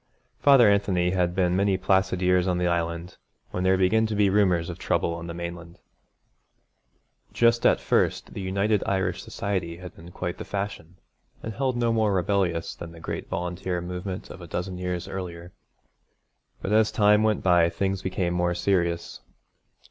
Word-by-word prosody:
Father 135 -5 +6
Anthony 95 -3 +2
had 90 -1 0
been 90 -2 +2
many 100 0 +2
placid 95 -1 +1
years 90 0 +3
on 90 -1 +1
the 90 - 0
Island 85 0 -2 0.3
when 90 - -3
there 95 0 +3
began 110 +4 +3
to 110 - -3
be 100 -2 +3
rumours 90 -5 +2
of 85 - -7
trouble 85 - 0
on 85 0 -6
the 85 - -5
mainland. 85 0 -7 1.6
Just 120 0 +4
at - - +3
first - - 0
the - - -5
United 100 +2 +1
Irish 95 -1 0
Society 90 -4 -3
had 90 0 -10
been 85 +1 -12
quite 90 0 -5
the - - -4
fashion, 100 -4 -5 0.5
and 110 - -5
held 130 +1 -1
no 120 -1 +1
more 110 -2 +2
rebellious 90 -2 0
than 85 -1 -9
the 85 - -12
great 80 - -5
volunteer 90 +1 -3
movement 90 +2 -6
of 95 - -10
a 85 - -9
dozen 90 +2 -4
years 90 -1 -3
earlier. 90 -2 -6 1.1
But 95 - -2
as 110 0 +4
time 105 0 +4
went 110 -1 +1
by 90 -2 +4
things 95 +1 -2
became 90 -2 -1
more 90 0 0
serious. 85 -2 -1
90 Hz, 170 wpm, -25 LUFS, 85-100 Hz, 1.6 s, Father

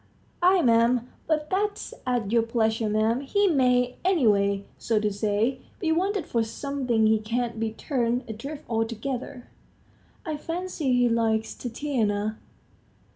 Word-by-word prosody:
"Ay, 365 +2 +5
'm. 235 0 +3 0.2
But 305 -1 0
that's 405 +2 -1
at 240 -5 0
your 235 0 +4
pleasure, 225 -1 0
'm. 220 +4 +1
He 405 +9 +1
may, 250 -7 +2
any 360 -7 +2
way, 200 -1 +2
so 225 -2 +1
to 210 -1 0
say, 215 +5 0 0.2
be 330 -5 0
wanted 380 +3 0
for 230 -1 0
something; 250 -1 -1
he 220 0 +4
can't 230 +1 -2
be 225 -1 -1
turned 245 0 -1
adrift 275 +7 -7
altogether." 235 +2 -3 0.8
"I 310 -3 -3
fancy 330 -3 -3
he 245 0 +4
likes 225 -1 +1
Tatiana." 220 -5 -2
240 Hz, 135 wpm, -26 LUFS, 220-280 Hz, 0.8 s, Ay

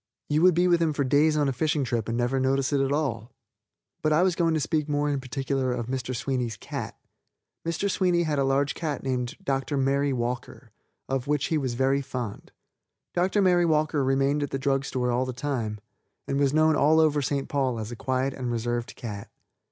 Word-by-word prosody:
You 150 +1 +2
would 180 -1 +6
be 175 +1 +3
with 175 -1 +3
him 160 -2 +2
for 145 - 0
days 150 +4 +3
on 145 -1 +2
a 135 - 0
fishing 150 +2 0
trip 115 -3 -2
and 115 - -1
never 125 +2 +1
notice 135 +1 +1
it 140 - +3
at 135 0 0
all. 130 -6 -1 0.7
But 155 - +1
I 155 +4 +4
was 185 -1 +3
going 165 -2 +2
to - - +1
speak 155 0 -1
more 145 0 +1
in 140 -2 -1
particular 130 +1 -2
of 120 -2 -3
Mi. 130 +1 -1
Sweeney's 125 -2 -3
cat. - - -6 0.7
Mr. 170 +4 0
Sweeney 180 -3 +2
had 150 -3 0
a - - +3
large 135 +1 +1
cat 150 -5 -4
named 125 -2 -2
Dr. 135 +1 -1
Mary 140 +1 +1
Walker, 125 -1 -4 0.4
of 135 0 -2
which 145 -1 +1
he 160 - +2
was 130 -4 -2
very 135 +2 +2
fond. 125 -6 -6 0.6
Dr. 190 +3 +2
Mary 175 -2 +4
Walker 155 -2 +1
remained 135 +2 +2
at 145 - -2
the - - -2
drug 135 0 0
store 125 -2 -1
all 125 +2 +1
the 130 - -3
time, 120 -5 -3 0.5
and 140 - 0
was 140 -2 +3
known 155 +1 +4
all 155 +3 +4
over 150 -2 +3
St. 140 0 -1
Paul 135 -4 0
as 110 +1 -5
a - - -5
quiet 130 +3 -1
and 125 -2 -4
reserved 120 +1 -2
cat. 105 -5 -7
135 Hz, 215 wpm, -26 LUFS, 125-150 Hz, 0.7 s, would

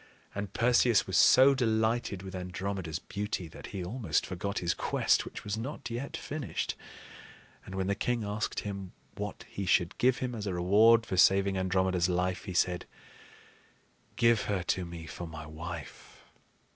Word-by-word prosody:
And 100 -1 -4
Perseus 120 -1 +3
was 95 - -3
so 135 +7 +7
delighted 110 -5 0
with 95 -1 -8
Andromeda's 90 -2 -4
beauty 100 -1 -4
that - - -10
he 95 - -5
almost 110 +4 -1
forgot 100 +3 -4
his 85 -1 +1
quest - - +1
which - - -8
was 105 +1 -3
not 125 0 -6
yet 125 +4 -4
finished; 150 -2 -3 0.9
and 95 - -7
when 95 -1 -1
the 100 - +1
king 120 +2 -1
asked 105 +1 -2
him 100 -3 -6 0.2
what 105 0 -6
he 100 -1 -5
should 85 0 +2
give 130 +1 +4
him 125 -1 -3
as 105 -3 -4
a 95 - -2
reward 110 +6 +5
for 95 - -3
saving 95 +2 +5
Andromeda's 95 -1 +1
life, 90 +1 -1
he 95 - -5
said: 90 0 +1 1.3
"Give 115 -2 +4
her 100 -4 -1
to 90 +1 -1
me 85 -1 -8
for 80 +3 -7
my 80 -1 -8
wife." 80 0 -9
100 Hz, 165 wpm, -30 LUFS, 90-110 Hz, 1.3 s, so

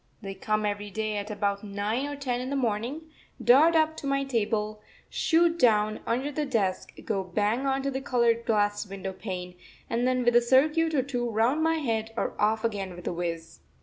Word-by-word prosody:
] - - -38
They 195 -1 -5
come 215 +2 -1
every 205 0 -3
day 215 +1 -2
at 205 +1 -4
about 200 -1 -1
nine 210 +6 -2
or 290 - -5
ten 255 -3 -2
in 255 - -4
the 280 - -2
morning, 240 +3 -1 0.4
dart 305 +7 +5
up 315 0 +3
to 280 - -5
my 275 0 +1
table, 215 -4 -1 0.3
shoot 335 0 +2
down 215 -3 +3
under 260 +5 -1
the 300 +1 -2
desk, 215 -9 -1
go 195 -4 -1
bang 210 +8 0
on 270 0 0
to 275 - -1
the 265 0 -3
coloured 235 -3 +2
glass 205 -2 +1
window 195 0 -6
pane, 180 -2 -6 0.4
and 240 +2 +1
then 255 -1 +1
with 240 0 +3
a 240 - +7
circuit 305 +6 +3
or 265 - +2
two 245 -3 -2
round 230 +7 +1
my 325 +1 +2
head 225 -7 -2
are - - -1
off 220 +2 +2
again 200 -5 -2
with 175 - -11
a - - 0
whizz. 165 -1 -5
230 Hz, 210 wpm, -27 LUFS, 205-270 Hz, 0.4 s, a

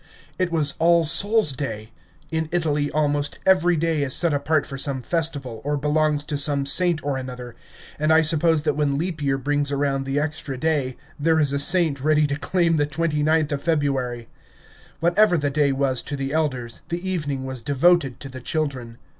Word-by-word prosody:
It 185 -2 0
was 150 -4 +2
All 170 0 +4
Souls' 200 +3 +4
Day. 110 -5 -6 0.4
In 160 -1 -2
Italy 150 -4 -1
almost 145 -1 -1
every 175 -2 +3
day 160 -1 -1
is 135 -2 +2
set 170 -3 +2
apart 145 +2 0
for 135 - -7
some 135 -1 -1
festival, 140 -7 -2
or 145 +1 -2
belongs 150 0 0
to 145 -2 -2
some 140 -1 +2
saint 170 +2 +2
or 140 -2 -2
another, 125 -2 -8 0.5
and 155 +1 +1
I 160 0 +5
suppose 160 0 +3
that 150 -2 0
when 145 -1 -1
leap 165 0 -4
year 135 -1 0
brings 145 +1 -1
around 140 -1 -1
the 135 +1 -1
extra 150 -3 -4
day, 145 -4 -1 0.2
there 160 +2 +2
is 145 -2 +4
a 140 - 0
saint 160 -4 +4
ready 155 0 +3
to 145 -1 -2
claim 170 +2 0
the 145 -1 0
29th 155 0 0
of 140 -1 -3
February. 135 -7 -2 0.7
Whatever 175 +2 +3
the 145 -2 -1
day 145 -1 +1
was 135 -2 0
to 145 - -5
the 135 0 -4
elders, 130 -7 -2
the 175 +2 -4
evening 150 -7 -3
was 130 -2 -6
devoted 140 +1 +1
to 135 - -8
the 130 -1 -10
children. 130 -6 -3
145 Hz, 190 wpm, -22 LUFS, 135-160 Hz, 0.7 s, I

